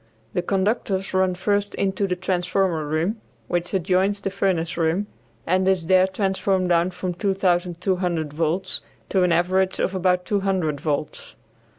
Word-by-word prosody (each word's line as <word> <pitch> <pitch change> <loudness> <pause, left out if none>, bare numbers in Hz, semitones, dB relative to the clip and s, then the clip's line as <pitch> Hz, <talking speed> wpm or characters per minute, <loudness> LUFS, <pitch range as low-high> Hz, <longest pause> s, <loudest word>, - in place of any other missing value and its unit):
The 180 - +1
conductors 195 0 -1
run 185 -1 +2
first 205 +2 0
into 195 0 0
the 180 - -1
transformer 180 -3 0
room, 170 +9 -1 0.3
which 175 0 -2
adjoins 190 +2 +1
the 195 -1 -3
furnace 180 -4 0
room, 170 +4 +1 0.4
and 185 +2 +2
is 190 -3 +2
there 185 +2 +5
transformed 190 -1 0
down 170 +1 +3
from 185 0 -4
2200 180 -3 0
volts 165 +4 0 0.3
to 190 - +2
an 180 -1 +3
average 185 +3 +2
of 190 - 0
about 180 -1 +1
200 190 -8 0
volts. 150 -1 -3
185 Hz, 145 wpm, -23 LUFS, 175-195 Hz, 0.4 s, there